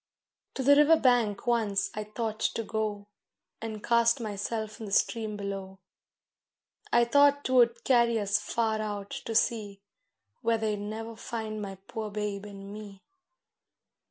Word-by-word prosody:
To 265 - -2
the 285 +2 +7
river 300 +3 +6
bank 240 -7 +2
once 220 -5 +1
I 215 0 -4
thought 215 0 -4
to 230 - -1
go, 215 -2 -3 0.6
And 220 -2 -6
cast 235 +2 +3
myself 215 0 -4
in 220 - -6
the - - -8
stream 215 +1 +1
below; 195 -1 -5 1.1
I 240 0 +5
thought 285 +3 +4
'twould 235 -2 +3
carry 235 -3 +3
us 205 0 +1
far 220 0 -1
out 205 -2 -5
to 225 - -5
sea, 210 -3 0 0.6
Where 230 0 +2
they'd 215 -1 -1
never 220 +2 -6
find 220 -1 -5
my 195 -1 -5
poor 220 -1 -5
babe 205 -1 -4
and 200 0 -9
me. 205 -2 -10
220 Hz, 145 wpm, -29 LUFS, 205-235 Hz, 1.1 s, the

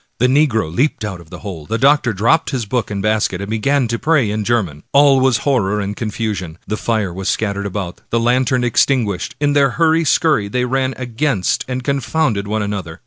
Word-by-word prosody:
The 125 - +2
negro 125 - +2
leaped 130 -3 0
out 95 -4 -6
of 80 - -17
the 90 - -10
hole, 85 -7 -7
the 115 - -1
doctor 135 -1 +3
dropped 115 - +2
his 130 -5 -2
book 115 +1 -2
and 100 -2 -4
basket, 105 -4 0
and 100 +2 -5
began 130 +4 +1
to 115 0 -2
pray 145 -10 +2
in 105 0 -2
German. 100 -10 -1
All 140 -1 +5
was 130 -3 +3
horror 105 -7 +1
and 100 0 -3
confusion. 105 -7 -4
The 110 - -2
fire 110 -5 -1
was 95 +1 -3
scattered 100 -2 -1
about, 95 -2 -5
the 115 - +1
lantern 125 +1 +1
extin 120 +1 +2
guished. 100 -3 -4
In 145 -1 +1
their 140 -1 +4
hurry 165 0 +3
scurry 150 -8 +2
^ - - -15
they 125 +2 0
ran 130 +1 -1
against 125 -4 -1
and 130 0 -4
con 140 +1 0
founded 115 -5 -1
one 110 0 -1
another. 95 -6 -5
115 Hz, 215 wpm, -18 LUFS, 100-135 Hz, -, All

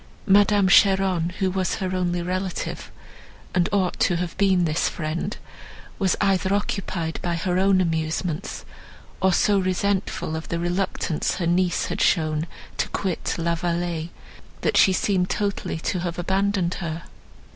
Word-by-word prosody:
Madame 205 0 +5
Cheron, 190 -3 +4
who 190 -2 +1
was 185 0 0
her 185 -2 -2
only 175 -1 0
relative, 185 +1 -3 0.6
and 175 -1 +2
ought 190 -3 0
to 175 - +3
have 175 0 -3
been 190 -3 +3
this 155 0 +1
friend, 170 +6 -3 0.6
was 190 -3 +2
either 195 -1 +2
occupied 185 -5 -2
by 175 -1 -1
her 180 +2 0
own 195 0 +4
amusements, 165 +2 -2 0.6
or 190 0 +4
so 200 +2 +3
resentful 185 -3 -1
of 160 - -5
the 170 - -2
reluctance 175 -2 -1
her 175 - -2
niece 175 +1 +1
had - - -3
shown 155 -2 +2 0.3
to - - -1
quit 190 -4 -2
La 170 0 0
Vallée, 170 -1 -2 0.5
that - - 0
she 190 - +6
seemed 185 -1 +1
totally 200 -5 -2
to 180 +3 -2
have 175 -1 -3
abandoned 190 0 0
her. 165 -2 -4
180 Hz, 145 wpm, -24 LUFS, 170-195 Hz, 0.6 s, she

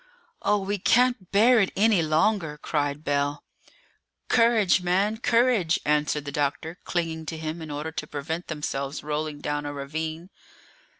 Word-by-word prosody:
"Oh, 210 - +2
we 200 0 -2
can't 245 -2 +2
bear 225 +4 +5
it 195 - +2
any 210 -3 +4
longer!" 160 0 +1
cried 145 -1 -2
Bell. 145 0 -1 0.9
"Courage, 225 -5 +4
man, 195 +5 +1
courage!" 230 -7 +2
answered 150 0 +1
the 145 - -4
doctor, 145 +4 -2
clinging 165 -2 -2
to 160 - -4
him 160 +1 -5
in 160 - -7
order 150 +2 -4
to 150 -1 -5
prevent 160 +4 -5
themselves 140 -2 -4
rolling 150 0 -3
down 145 0 -2
a 145 - -4
ravine. 160 +5 -5
160 Hz, 145 wpm, -25 LUFS, 150-200 Hz, 0.9 s, bear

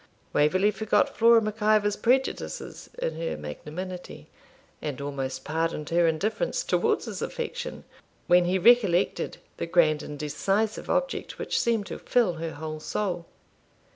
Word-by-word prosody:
Waverley 185 +8 +3
forgot 220 0 +1
Flora 230 0 +6
Mac 215 +1 -4
Ivor's 210 -1 +3
prejudices 240 - -1
in 160 -1 -2
her 165 - -2
magnanimity, 150 - -7 0.5
and 145 -3 -4
almost 135 -2 -4
pardoned 160 -1 -2
her 170 0 +4
indifference 220 - 0
towards - - +1
his - - -6
affection 485 0 -4 0.4
when 175 0 +5
he 180 +2 +2
recollected 200 -3 +3 0.2
the - - -3
grand 155 -3 +3
and 150 - -7
decisive 195 +9 -1
object - - -1
which - - -1
seemed 225 -3 +1
to - - -7
fill 235 -8 +2
her 165 -1 -3
whole 155 +1 -6
soul. 175 0 -3
180 Hz, 140 wpm, -27 LUFS, 155-215 Hz, 0.5 s, Flora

